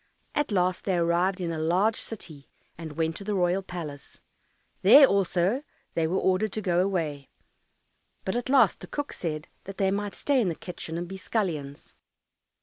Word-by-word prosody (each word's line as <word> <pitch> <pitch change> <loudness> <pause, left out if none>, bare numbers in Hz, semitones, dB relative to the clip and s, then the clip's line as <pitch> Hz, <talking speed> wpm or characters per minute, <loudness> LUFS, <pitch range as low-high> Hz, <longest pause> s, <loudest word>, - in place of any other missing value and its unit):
At 295 -5 0
last 185 -2 +1
they 190 - +1
arrived 175 +3 +1
in 175 -2 -2
a 160 - -3
large 185 +8 +2
city 160 -10 -7 0.3
and 160 -2 -8
went 160 +1 -1
to - - -6
the 205 +1 -2
royal 180 +1 +2
palace. 160 -7 -8 0.6
There 285 0 +9
also 195 +2 +1 0.3
they 165 -1 +1
were 180 +4 0
ordered 190 +3 +1
to - - -1
go 175 -2 +2
away, 165 -7 -1 1.0
but 190 - -1
at 245 +1 -2
last 275 0 +5
the - - -9
cook 290 -1 -4
said 155 -2 -4 0.2
that 195 0 -8
they 190 -1 +2
might 205 0 -2
stay 280 -3 +2
in 200 - +1
the 165 - -3
kitchen 165 -2 -6
and 175 +1 -4
be 190 +2 -7
scullions. 160 -9 -3
180 Hz, 180 wpm, -27 LUFS, 165-200 Hz, 1.0 s, There